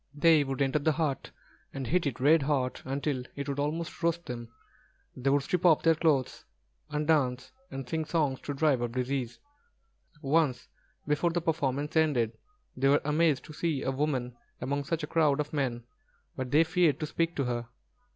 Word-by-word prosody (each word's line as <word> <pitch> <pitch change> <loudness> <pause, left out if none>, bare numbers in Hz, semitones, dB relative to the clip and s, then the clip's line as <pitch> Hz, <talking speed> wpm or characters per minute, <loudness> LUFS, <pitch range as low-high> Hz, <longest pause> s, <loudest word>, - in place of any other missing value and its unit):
They 155 0 +5
would 135 0 -1
enter 135 +2 +1
the 155 +2 +2
hut, 145 -4 -2 0.5
and 135 -1 -3
heat 170 +4 +1
it 135 - -4
red 150 +4 +5
hot 135 -3 -1
until 140 0 -2
it 140 0 -5
would 140 0 -3
almost 160 +4 -3
roast 170 0 0
them. 120 -2 -6 0.7
They 130 +2 0
would 140 0 +3
strip 180 +4 -1
off 165 -4 +5
their 165 - +5
clothes, 155 -5 0 0.5
and 150 0 -2
dance 130 -5 +1 0.2
and 135 -1 -6
sing 160 +4 -2
songs 150 -5 0
to 145 - -4
drive 140 -4 +2
off 120 -1 -2
disease. 125 -1 -2 0.8
Once 140 -3 +1 0.4
before 150 +4 +2
the 170 +1 0
performance 150 -3 -1
ended, 135 -8 +2 0.4
they 135 +2 +1
were 145 +1 +4
amazed 150 -1 +2
to 155 - -10
see 155 -3 -1
a 135 - 0
woman 130 -3 -1 0.2
among 140 +3 -2
such 165 +1 -2
a - - 0
crowd 150 -2 +2
of 150 0 -3
men; 125 -5 -1 0.5
but 130 -1 -4
they 150 +5 +5
feared 165 -3 +2
to - - 0
speak 165 +2 -1
to 140 - 0
her. 120 -2 -2
145 Hz, 185 wpm, -29 LUFS, 130-160 Hz, 0.8 s, They